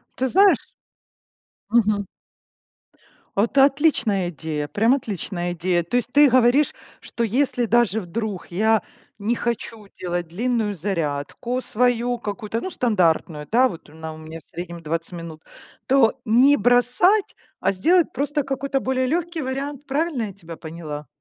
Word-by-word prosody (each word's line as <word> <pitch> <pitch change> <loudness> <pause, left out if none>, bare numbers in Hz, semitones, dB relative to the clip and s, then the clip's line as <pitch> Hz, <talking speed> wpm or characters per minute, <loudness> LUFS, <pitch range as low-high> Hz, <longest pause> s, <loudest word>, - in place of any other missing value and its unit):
Ты 260 - 0
знаешь 390 +8 +4 1.0
Мгм. 210 -3 +2 1.3
Это 235 +6 +4
отличная 265 - +2
идея, 150 -2 -4
прям 225 - +2
отличная 190 - -4
идея! 175 0 0
То 170 - -4
есть 245 0 -2
ты 290 -1 +6
говоришь, 255 +4 +4 0.3
что 235 - -4
если 250 +2 +1
даже 225 -1 +2
вдруг 200 +1 -4
я 220 +4 +2 0.4
не 220 +4 0
хочу 230 -3 -4
делать 175 -1 -3
длинную 220 +3 -1
зарядку 170 - -3
свою 245 +1 +1
какую-то, 210 0 -4
ну, 375 - -4
стандартную, 170 - +1
да. 255 +3 +4
Вот 170 -8 -10
она 160 +1 -8
у 155 - -11
меня 160 +1 -9
в - - -28
среднем 170 -1 -6
20 165 +3 -3
минут, 165 -2 -8 0.5
то 265 -1 +3
не 255 +6 +5
бросать, 250 - +3 0.3
а - - +2
сделать 330 - +3
просто 290 +2 -1
какой-то 275 0 -2
более 260 0 0
лёгкий 335 +2 -1
вариант. 275 +2 -4
Правильно 280 -3 -1
я 200 - -5
тебя 170 -4 -11
поняла? 155 -2 -7
225 Hz, 140 wpm, -22 LUFS, 175-260 Hz, 1.3 s, ты